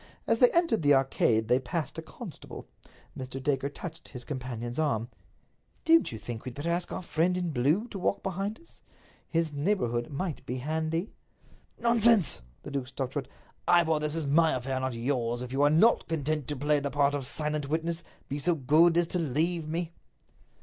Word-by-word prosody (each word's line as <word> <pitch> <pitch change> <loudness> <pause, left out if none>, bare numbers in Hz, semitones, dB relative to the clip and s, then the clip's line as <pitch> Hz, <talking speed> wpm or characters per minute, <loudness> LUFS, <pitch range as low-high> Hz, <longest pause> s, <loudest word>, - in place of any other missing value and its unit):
As 230 - +2
they 250 - +7
entered 335 - +2
the 145 -2 +5
Arcade 120 -4 +2
they 125 +2 +4
passed 155 +1 -3
a - - -4
constable. - - -10 0.5
Mr. 130 0 -6
Dacre 140 0 0
touched 160 +3 -8
his 125 -2 -8
companion's 125 -2 -4
arm. 120 -7 0 0.8
"Don't 330 0 +5
you 110 - -5
think 110 +2 -7
we'd 125 -2 -7
better 160 +4 -2
ask 175 +1 -1
our - - -4
friend 175 +2 +1
in 175 -2 -1
blue 150 - +1
to 195 - -6
walk 185 - 0
behind 195 +3 -3
us? 335 - -18 0.5
His 165 -2 0
neighborhood 140 - 0
might 155 +2 -4
be 125 - -2
handy." 160 - -2 0.7
"Nonsense!" 235 -5 +3 0.2
The - - -7
duke 135 -3 -2
stopped 130 -1 -4
short. 145 - -3 0.4
"Ivor, 160 -3 +4
this 150 +1 -2
is 165 -2 -1
my 160 +2 +4
affair, 130 +1 -2
not 130 -2 -2
yours. 120 -1 -1
If 125 - -7
you 135 +2 0
are 145 - +6
not 170 +10 +4
content 155 -3 -1
to 145 - -2
play 145 +2 +2
the 140 0 -2
part 140 0 +2
of 140 -3 -2
silent 150 -1 -2
witness, 165 +2 -1 0.2
be 140 - -3
so 170 +4 +2
good 160 +4 +4
as 175 - +4
to 180 - -1
leave 160 +2 0
me." 165 +1 -2
150 Hz, 190 wpm, -29 LUFS, 130-170 Hz, 0.8 s, they